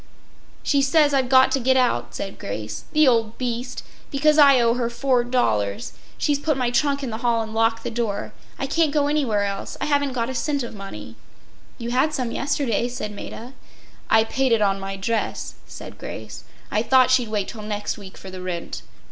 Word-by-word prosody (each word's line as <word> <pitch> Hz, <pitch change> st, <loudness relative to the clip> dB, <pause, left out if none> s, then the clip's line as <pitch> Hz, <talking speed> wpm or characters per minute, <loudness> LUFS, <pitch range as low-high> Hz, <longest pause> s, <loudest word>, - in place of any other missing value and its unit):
“She 280 Hz, -2 st, +2 dB
says 290 Hz, +1 st, +4 dB
I’ve 265 Hz, -2 st, +2 dB
got 260 Hz, 0 st, +6 dB
to 270 Hz, -, +2 dB
get 260 Hz, +1 st, +3 dB
out,” 250 Hz, -1 st, +1 dB
said 195 Hz, -, -5 dB
Grace. 110 Hz, +4 st, -5 dB
“The 305 Hz, -1 st, +4 dB
old 230 Hz, -3 st, +2 dB
beast. 250 Hz, 0 st, -3 dB, 0.3 s
Because 300 Hz, +2 st, +3 dB
I 280 Hz, -3 st, +8 dB
owe 235 Hz, -1 st, +3 dB
her 240 Hz, -1 st, -1 dB
$4. 240 Hz, -, 0 dB, 0.3 s
She’s 290 Hz, -2 st, +1 dB
put 300 Hz, -1 st, 0 dB
my 250 Hz, -2 st, 0 dB
trunk 280 Hz, +2 st, +1 dB
in 255 Hz, -, -3 dB
the 220 Hz, -, -4 dB
hall 235 Hz, -1 st, +1 dB
and 220 Hz, 0 st, -8 dB
locked 225 Hz, 0 st, +1 dB
the -, -, -3 dB
door. 220 Hz, -3 st, -3 dB, 0.2 s
I -, -, -2 dB
can’t 310 Hz, +2 st, +2 dB
go 290 Hz, -1 st, +3 dB
anywhere 270 Hz, -9 st, +1 dB
else. 200 Hz, -1 st, -4 dB
I -, -, -1 dB
haven’t 285 Hz, -2 st, +1 dB
got 230 Hz, -2 st, 0 dB
a 260 Hz, -, -4 dB
cent 280 Hz, +2 st, -1 dB
of 235 Hz, -, -6 dB
money.” 115 Hz, -, -9 dB, 0.6 s
“You 235 Hz, 0 st, -4 dB
had 285 Hz, +5 st, +2 dB
some 250 Hz, -3 st, -2 dB
yesterday,” 265 Hz, -4 st, 0 dB
said 240 Hz, -4 st, -5 dB
Maida. 230 Hz, +4 st, -8 dB, 0.6 s
“I 220 Hz, -, +5 dB
paid 260 Hz, +3 st, 0 dB
it 225 Hz, -2 st, +4 dB
on 195 Hz, -1 st, +1 dB
my 195 Hz, 0 st, -5 dB
dress,” 220 Hz, +3 st, -2 dB
said -, -, -10 dB
Grace. -, -, -8 dB, 0.3 s
“I 210 Hz, -, +2 dB
thought 255 Hz, +2 st, +4 dB
she’d 250 Hz, -3 st, +3 dB
wait 210 Hz, -3 st, -1 dB
till 220 Hz, -, -8 dB
next 210 Hz, 0 st, -3 dB
week 190 Hz, -2 st, -11 dB
for 190 Hz, -, -10 dB
the 185 Hz, 0 st, -7 dB
rent. 180 Hz, -2 st, -5 dB
240 Hz, 200 wpm, -23 LUFS, 210-270 Hz, 0.6 s, I